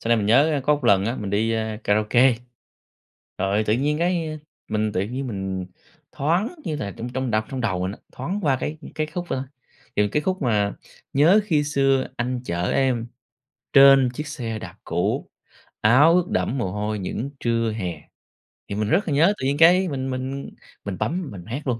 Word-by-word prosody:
Sau 115 Hz, -, -5 dB
này 115 Hz, -, +5 dB
mình 105 Hz, -2 st, -1 dB
nhớ 145 Hz, +6 st, +4 dB
có 150 Hz, -, +4 dB
một 145 Hz, -4 st, -6 dB
lần 100 Hz, -3 st, +4 dB
á, 115 Hz, +3 st, -1 dB
mình 100 Hz, -2 st, -4 dB
đi, 110 Hz, +3 st, +1 dB
a, 110 Hz, -1 st, -2 dB
karaoke, 110 Hz, +5 st, +4 dB, 1.0 s
rồi 100 Hz, +3 st, +1 dB
tự 105 Hz, -, +2 dB
nhiên 150 Hz, +4 st, 0 dB
cái 170 Hz, -2 st, 0 dB
a, 155 Hz, -, -5 dB, 0.3 s
mình 110 Hz, -1 st, 0 dB
tự -, -, 0 dB
nhiên 130 Hz, +6 st, -4 dB
mình 95 Hz, -4 st, -4 dB, 0.5 s
thoáng 175 Hz, -, 0 dB
như 155 Hz, -, -2 dB
là 100 Hz, -8 st, -4 dB
trong 120 Hz, -, -5 dB
trong 130 Hz, 0 st, -3 dB
đ -, -, -1 dB, 0.2 s
trong 130 Hz, -2 st, -4 dB
đầu 95 Hz, -6 st, -1 dB
mình 95 Hz, +1 st, -2 dB
á, -, -, -11 dB
thoáng 180 Hz, +11 st, -4 dB
qua 135 Hz, -3 st, +2 dB
cái 155 Hz, +1 st, -3 dB, 0.2 s
cái 155 Hz, 0 st, -1 dB
khúc 175 Hz, +2 st, -5 dB
ơ, 130 Hz, -, -2 dB, 0.5 s
kiểu, 105 Hz, 0 st, +3 dB
cái 150 Hz, -, +1 dB
khúc 185 Hz, +1 st, -1 dB
mà 105 Hz, -5 st, +1 dB, 0.4 s
"Nhớ 165 Hz, +10 st, +5 dB
khi 150 Hz, -7 st, +1 dB
xưa 135 Hz, -2 st, +1 dB
anh 125 Hz, 0 st, -2 dB
chở 85 Hz, -2 st, -1 dB
em, 125 Hz, -4 st, +1 dB, 0.7 s
trên 135 Hz, -2 st, +7 dB
chiếc 150 Hz, +3 st, -5 dB
xe 115 Hz, -7 st, -4 dB
đạp -, -, -9 dB
cũ, -, -, -1 dB, 0.5 s
áo 145 Hz, +10 st, +6 dB
ướt 180 Hz, 0 st, +2 dB
đẫm 135 Hz, -, 0 dB
mồ 95 Hz, -7 st, -2 dB
hôi 105 Hz, +1 st, -2 dB
những 110 Hz, +8 st, -4 dB
trưa 115 Hz, -1 st, 0 dB
hè". 95 Hz, -6 st, -4 dB, 0.7 s
Thì 100 Hz, -, -3 dB
mình 105 Hz, 0 st, -1 dB
rất 200 Hz, -, +2 dB
là 150 Hz, -, 0 dB
nhớ, 165 Hz, +8 st, +4 dB
tự 130 Hz, -, -3 dB
nhiên 140 Hz, +1 st, 0 dB
cái 180 Hz, +3 st, +6 dB
mình 135 Hz, -2 st, -3 dB
mình 130 Hz, +2 st, -4 dB, 0.4 s
mình 100 Hz, -3 st, -4 dB
bấm 160 Hz, +9 st, -2 dB
mình 90 Hz, -3 st, -9 dB
hát 135 Hz, +6 st, -5 dB
luôn. 120 Hz, -2 st, 0 dB
130 Hz, 205 wpm, -23 LUFS, 105-150 Hz, 1.0 s, trên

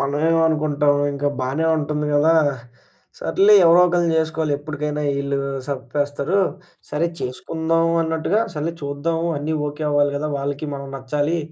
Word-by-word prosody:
మనమేం 150 Hz, +4 st, +1 dB
అనుకుంటాం 150 Hz, -2 st, +1 dB, 0.2 s
ఇంకా 145 Hz, +1 st, -1 dB
బానే 135 Hz, +5 st, -1 dB
ఉంటుంది 150 Hz, 0 st, -2 dB
గదా! 155 Hz, +3 st, +4 dB, 0.8 s
సర్లే 205 Hz, +2 st, +4 dB
ఎవరో 170 Hz, +2 st, +7 dB
ఒకళ్ళని 175 Hz, -2 st, +1 dB
జేసుకోవాలి 160 Hz, -1 st, 0 dB
ఎప్పటికైనా 150 Hz, 0 st, -4 dB, 0.2 s
ఈళ్ళు 140 Hz, 0 st, -1 dB, 0.3 s
సప్పేస్తారు. 145 Hz, +5 st, -2 dB, 0.5 s
సరే 155 Hz, +3 st, 0 dB
చేసుకుందాం 165 Hz, +6 st, -1 dB
అన్నట్టుగా 160 Hz, +6 st, 0 dB
సర్లే 155 Hz, +2 st, -2 dB
చూద్దాము 160 Hz, +4 st, -2 dB
అన్నీ 155 Hz, +2 st, -2 dB
ఓకే 150 Hz, +2 st, -6 dB
అవ్వాలి 145 Hz, 0 st, +2 dB
గదా! 150 Hz, +1 st, -2 dB
వాళ్ళకి 145 Hz, +2 st, -3 dB
మనం 140 Hz, 0 st, -7 dB
నచ్చాలి. 145 Hz, +5 st, -1 dB
150 Hz, 130 wpm, -21 LUFS, 145-160 Hz, 0.8 s, ఎవరో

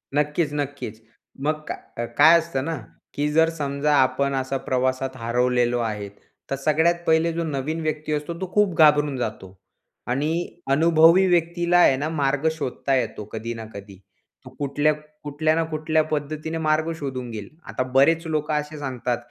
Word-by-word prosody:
नक्कीच-नक्कीच. 145 Hz, -6 st, -2 dB, 0.4 s
मग 155 Hz, +2 st, +1 dB
काय 120 Hz, -, -6 dB
काय 160 Hz, +3 st, +8 dB
असतं 160 Hz, -5 st, -3 dB
ना 165 Hz, -, -2 dB, 0.4 s
की 145 Hz, +1 st, -1 dB
जर 160 Hz, +2 st, +4 dB
समजा 145 Hz, -2 st, -1 dB
आपण 140 Hz, +1 st, +2 dB
असा 135 Hz, +1 st, -1 dB
प्रवासात 130 Hz, +1 st, 0 dB
हरवलेलो 120 Hz, +1 st, +1 dB
आहे 105 Hz, -3 st, -3 dB, 0.4 s
तर 135 Hz, -, 0 dB
सगळ्यात 155 Hz, +5 st, +2 dB
पहिले 160 Hz, +1 st, +3 dB
जो 170 Hz, +1 st, -2 dB
नवीन 155 Hz, +1 st, -3 dB
व्यक्ती 155 Hz, -1 st, -3 dB
असतो, 150 Hz, +3 st, -3 dB
तो 185 Hz, -1 st, -4 dB
खूप 205 Hz, -4 st, +2 dB
घाबरून 150 Hz, -3 st, +4 dB
जातो. 110 Hz, -5 st, -5 dB, 0.5 s
आणि 140 Hz, +5 st, 0 dB, 0.4 s
अनुभवी 165 Hz, +5 st, +5 dB
व्यक्तीला 175 Hz, 0 st, +2 dB
आहे 175 Hz, -6 st, +6 dB
ना 150 Hz, +3 st, -2 dB
मार्ग 145 Hz, -1 st, 0 dB
शोधता 140 Hz, -3 st, -2 dB
येतो. 105 Hz, -4 st, -2 dB
कधी 115 Hz, +1 st, -4 dB
ना 115 Hz, -1 st, -7 dB
कधी 100 Hz, -1 st, -10 dB, 0.5 s
तो -, -, -9 dB
कुठल्या 150 Hz, +1 st, -1 dB
ना 165 Hz, -, +1 dB
कुठल्या 155 Hz, 0 st, +1 dB
पद्धतीने 155 Hz, +2 st, -3 dB
मार्ग 155 Hz, +1 st, +1 dB
शोधून 130 Hz, -5 st, -5 dB
घेईल. 105 Hz, -3 st, -7 dB, 0.2 s
आता -, -, -2 dB
बरेच 165 Hz, +5 st, +4 dB
लोकं 155 Hz, -1 st, -1 dB
असे 150 Hz, +1 st, -2 dB
सांगतात 125 Hz, -3 st, -2 dB
150 Hz, 150 wpm, -23 LUFS, 130-160 Hz, 0.5 s, काय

